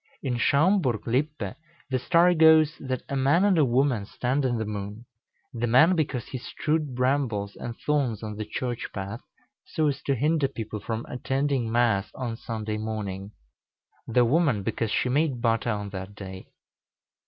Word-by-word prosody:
In 125 -4 -1
Schaumburg 140 - +2
Lippe, 125 -4 -1 0.4
the 130 - +1
story 170 +6 +4
goes, 160 -2 +6
that 130 -2 -3
a 140 - -3
man 140 +7 +3
and 200 -2 +4
a - - +6
woman 125 -4 +1
stand 130 +6 -1
in 120 -2 +1
the 110 - -2
moon, 105 +2 -6 0.5
the 120 0 -1
man 155 +10 +6
because 140 -7 -1
he 130 - -5
strewed 150 +1 -2
brambles 125 -6 0
and 120 -1 -6
thorns 135 -8 0
on 105 -1 -5
the 110 - -4
church 120 +2 -4
path, 100 +3 -5 0.4
so 155 -2 0
as 140 - -3
to 140 - 0
hinder 150 +2 +2
people 110 -5 -6
from 115 +2 -4
attending 135 -1 -1
Mass 115 -4 +2
on 120 -3 -3
Sunday 110 -1 -4
morning; 105 -2 -4 0.7
the 120 +1 +3
woman 135 - +2
because 115 +3 -1
she 115 - +1
made 140 0 +1
butter 115 0 +1
on 105 -2 -3
that 95 +1 -7
day. 95 -2 -9
125 Hz, 165 wpm, -26 LUFS, 110-145 Hz, 0.7 s, goes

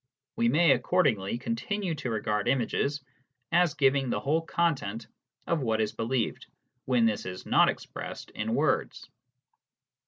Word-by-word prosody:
We 115 - +2
may 160 +4 +4
accordingly 120 - +1
continue 205 - -2
to 135 -5 -4
regard 105 -2 -1
images 135 +3 0 0.5
as 175 -2 +3
giving 135 -2 +2
the - - 0
whole 155 +4 +1
content 140 -11 -1 0.4
of 170 - 0
what 110 -3 0
is 110 -1 0
believed, 115 +1 -2 0.4
when 125 -3 +3
this 110 -4 0
is 90 0 -7
not - - +4
expressed - - -6
in - - -2
words. - - 0
130 Hz, 135 wpm, -28 LUFS, 115-165 Hz, 0.5 s, may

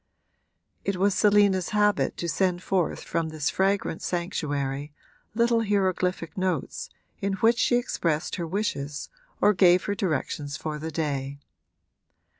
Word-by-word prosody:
It 195 - -1
was 195 +2 +3
Selina's 205 -3 +4
habit 210 0 +2
to 170 - -3
send 180 +1 0
forth 185 -4 0
from 165 -1 -2
this 155 -1 -1
fragrant 195 -3 0
sanctuary 145 -5 -2 0.4
little 235 0 +3
hieroglyphic 185 -4 0
notes 185 -7 -2 0.3
in 195 0 -1
which 225 +5 +3
she 245 - +3
expressed 170 -10 -1
her 170 -2 -3
wishes 150 -7 -3 0.3
or 210 - +5
gave 180 -2 +5
her 205 - -1
directions 155 -6 -2
for 155 -1 -4
the 160 +2 -4
day. 140 -3 -2
180 Hz, 130 wpm, -26 LUFS, 155-200 Hz, 0.4 s, or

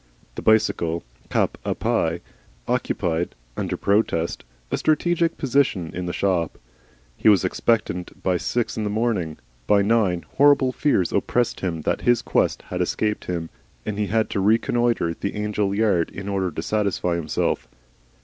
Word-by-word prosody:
The - - -6
bicycle, 85 -6 +2 0.3
cap - - 0
a - - -1
pie, 85 +1 0 0.5
occupied, 90 -9 -1 0.2
under - - -2
protest, 100 -5 +1 0.3
a - - +1
strategic 165 +2 +1
position 125 - +1
in 90 0 -4
the - - -1
shop. 90 -4 0 0.6
He 110 - +4
was 100 -3 +5
expectant 95 -2 -1
by 90 -1 +2
six 120 +6 -1
in 110 - -2
the 105 - -1
morning. 105 -8 -1 0.3
By 100 -1 +4
nine 100 -5 +2
horrible 140 -2 +5
fears 125 - +1
oppressed 120 -1 +1
him 85 -4 -2
that - - -1
his 120 -1 +3
quest - - +1
had - - -4
escaped 105 -1 -1
him, 85 -2 -3 0.3
and 105 -1 -3
he 105 - 0
had 110 +1 0
to - - -1
reconnoitre 115 -2 +2
the 100 - -4
Angel 105 -1 -1
yard 100 -6 +2
in 100 0 -8
order 95 -2 0
to 80 0 -5
satisfy 100 -4 0
himself. 80 -3 -1
100 Hz, 155 wpm, -23 LUFS, 90-115 Hz, 0.6 s, was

